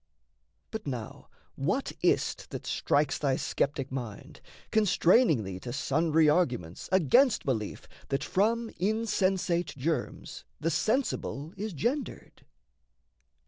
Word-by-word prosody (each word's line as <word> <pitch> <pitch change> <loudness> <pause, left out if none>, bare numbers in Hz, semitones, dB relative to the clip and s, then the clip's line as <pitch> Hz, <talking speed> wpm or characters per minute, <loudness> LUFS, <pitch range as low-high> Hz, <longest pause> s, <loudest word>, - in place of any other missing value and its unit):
But 220 -5 -5
now, 120 -5 -6 0.2
what - - -1
is't - - +1
that - - -6
strikes 145 -1 +1
thy 135 -3 +1
sceptic 135 0 -1
mind, 120 -6 -7 0.3
Constraining 195 - +4
thee 95 -1 -6
to 120 - -6
sundry 155 +4 +2
arguments 125 - 0
Against 190 - +4
belief 110 -7 -2 0.2
that 135 - -1
from 225 +4 +1
insensate 190 -5 0
germs 155 +4 -3 0.2
The 165 +2 0
sensible 200 - -1
is 210 0 -4
gendered? 245 - -3
160 Hz, 105 wpm, -29 LUFS, 135-210 Hz, 0.3 s, Constraining